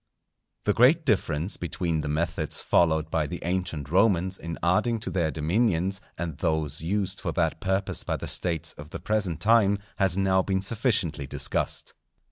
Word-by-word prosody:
_ -, -, -51 dB
The 105 Hz, -, +2 dB
great 145 Hz, +9 st, +5 dB
difference 90 Hz, -, 0 dB
between 85 Hz, -2 st, -2 dB
the -, -, -4 dB
methods 80 Hz, 0 st, -1 dB
followed 80 Hz, -2 st, +2 dB
by 80 Hz, -2 st, +1 dB
the 90 Hz, +4 st, -5 dB
ancient 85 Hz, -5 st, -2 dB
Romans 95 Hz, -1 st, +2 dB
in 85 Hz, -1 st, -5 dB
adding 110 Hz, +7 st, +2 dB
to -, -, -4 dB
their 85 Hz, -4 st, +1 dB
dominions, 95 Hz, +4 st, 0 dB, 0.2 s
and 80 Hz, -4 st, -4 dB
those 80 Hz, -4 st, 0 dB
used 95 Hz, +2 st, -1 dB
for 85 Hz, -, -2 dB
that 80 Hz, -1 st, 0 dB
purpose 95 Hz, +1 st, 0 dB
by -, -, -2 dB
the -, -, -6 dB
States 85 Hz, -5 st, 0 dB
of 75 Hz, +1 st, -9 dB
the -, -, -6 dB
present 105 Hz, -6 st, -1 dB
time, 105 Hz, -3 st, +4 dB, 0.2 s
has 95 Hz, -3 st, +2 dB
now 95 Hz, -1 st, +3 dB
been 95 Hz, 0 st, -1 dB
sufficiently 95 Hz, -, 0 dB
discussed. -, -, -2 dB
90 Hz, 170 wpm, -26 LUFS, 80-100 Hz, 0.2 s, great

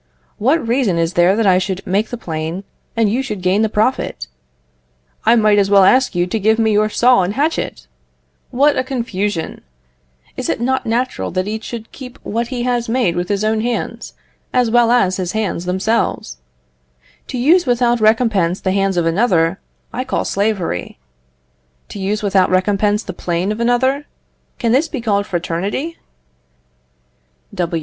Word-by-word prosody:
What 265 Hz, +3 st, +1 dB
reason 230 Hz, -7 st, +1 dB
is 165 Hz, +1 st, 0 dB
there 175 Hz, +3 st, +4 dB
that 225 Hz, 0 st, +1 dB
I 185 Hz, -2 st, +5 dB
should 190 Hz, +1 st, -4 dB
make 200 Hz, +4 st, 0 dB
the 245 Hz, -, -5 dB
plane, 165 Hz, -1 st, -4 dB, 0.3 s
and 225 Hz, -1 st, +3 dB
you 230 Hz, +6 st, 0 dB
should 210 Hz, -8 st, -5 dB
gain 185 Hz, +3 st, +2 dB
the 220 Hz, -, +2 dB
profit? 210 Hz, -, -1 dB, 1.0 s
I 230 Hz, -, +6 dB
might 215 Hz, -2 st, +4 dB
as 195 Hz, -1 st, +2 dB
well 200 Hz, -1 st, +6 dB
ask 255 Hz, +2 st, +4 dB
you 175 Hz, 0 st, +2 dB
to 200 Hz, +5 st, -2 dB
give 220 Hz, +2 st, +2 dB
me 225 Hz, -1 st, +2 dB
your 215 Hz, +1 st, +2 dB
saw 245 Hz, +1 st, +4 dB
and 185 Hz, +3 st, -2 dB
hatchet! 295 Hz, -, -2 dB, 0.6 s
What 285 Hz, +3 st, +3 dB
a -, -, +1 dB
confusion! 210 Hz, -9 st, -3 dB, 0.7 s
Is -, -, -4 dB
it -, -, -1 dB
not 260 Hz, +1 st, -1 dB
natural 245 Hz, +3 st, -1 dB
that 185 Hz, +1 st, -2 dB
each 220 Hz, +1 st, -4 dB
should 230 Hz, -2 st, -7 dB
keep 250 Hz, -2 st, -10 dB
what 230 Hz, +2 st, -2 dB
he 245 Hz, -1 st, -3 dB
has 240 Hz, -2 st, -1 dB
made 230 Hz, -8 st, +1 dB
with 175 Hz, 0 st, -2 dB
his 205 Hz, 0 st, 0 dB
own 215 Hz, 0 st, +1 dB
hands, 240 Hz, +1 st, -4 dB, 0.4 s
as 245 Hz, -3 st, +2 dB
well 240 Hz, 0 st, +4 dB
as 195 Hz, -7 st, +2 dB
his 185 Hz, -1 st, -3 dB
hands 205 Hz, -5 st, -2 dB
themselves? 185 Hz, -, -1 dB, 0.9 s
To 255 Hz, -, -5 dB
use 320 Hz, +7 st, +3 dB
without 240 Hz, -1 st, +2 dB
recompense 215 Hz, -5 st, +2 dB
the 185 Hz, -, -1 dB
hands 195 Hz, -1 st, 0 dB
of 170 Hz, -, +1 dB
another, 170 Hz, -1 st, +2 dB, 0.3 s
I 255 Hz, -, -2 dB
call 260 Hz, -, -2 dB
slavery; 195 Hz, -, -2 dB, 0.9 s
to 205 Hz, -, -8 dB
use 205 Hz, +2 st, -2 dB
without 195 Hz, -2 st, +3 dB
recompense 205 Hz, +3 st, +1 dB
the 185 Hz, -, -6 dB
plane 175 Hz, +3 st, -2 dB
of 215 Hz, -, -4 dB
another, 260 Hz, +4 st, +1 dB, 0.5 s
can 230 Hz, -, 0 dB
this 275 Hz, +7 st, +3 dB
be 295 Hz, -, -5 dB
called 205 Hz, -3 st, 0 dB
fraternity? 195 Hz, -, -3 dB
215 Hz, 170 wpm, -17 LUFS, 185-240 Hz, 1.0 s, I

